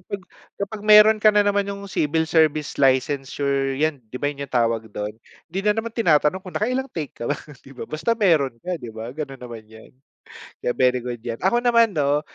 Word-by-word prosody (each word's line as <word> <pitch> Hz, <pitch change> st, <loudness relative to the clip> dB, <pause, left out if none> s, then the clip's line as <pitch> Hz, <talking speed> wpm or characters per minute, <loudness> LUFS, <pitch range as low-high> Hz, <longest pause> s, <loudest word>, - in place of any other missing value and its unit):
'pag 200 Hz, +1 st, -5 dB, 0.4 s
kapag 200 Hz, +2 st, -4 dB
meron 215 Hz, +1 st, +8 dB
ka 215 Hz, -, +6 dB
na 205 Hz, 0 st, +4 dB
naman 205 Hz, 0 st, +1 dB
yung 200 Hz, 0 st, -6 dB
civil 160 Hz, -2 st, 0 dB
service 155 Hz, -2 st, +1 dB
licensure 135 Hz, +1 st, +1 dB
yan, 155 Hz, -1 st, 0 dB
'di 120 Hz, -, -7 dB
ba, 145 Hz, -, +1 dB
yun 140 Hz, 0 st, -6 dB
yung 140 Hz, -, -16 dB
tawag 115 Hz, -2 st, +1 dB
dun. 105 Hz, 0 st, -5 dB, 0.4 s
Hindi 185 Hz, +4 st, -3 dB
na 210 Hz, -, +4 dB
naman 225 Hz, 0 st, -3 dB
tinatanong 170 Hz, -5 st, +2 dB
kung 185 Hz, -, -9 dB
nakailang 255 Hz, +5 st, -1 dB
take 155 Hz, -4 st, -5 dB
ka -, -, -6 dB
ba, 145 Hz, -, 0 dB, 0.3 s
'di 135 Hz, -, -13 dB
ba? -, -, -6 dB
Basta 160 Hz, +10 st, -1 dB
meron 160 Hz, -, +2 dB
ka 180 Hz, -1 st, -2 dB
'di 120 Hz, -, -8 dB
ba 115 Hz, +2 st, -7 dB
,ganun 135 Hz, -3 st, -7 dB
naman 120 Hz, -3 st, -9 dB
yan, 110 Hz, 0 st, -15 dB, 0.7 s
kaya 125 Hz, -, -1 dB
very 125 Hz, 0 st, +3 dB
good 120 Hz, -1 st, -6 dB
yan. 115 Hz, -1 st, -3 dB
Ako 215 Hz, +6 st, +2 dB
naman 235 Hz, -3 st, +3 dB
'no, 145 Hz, -2 st, +1 dB
150 Hz, 210 wpm, -22 LUFS, 130-200 Hz, 0.7 s, meron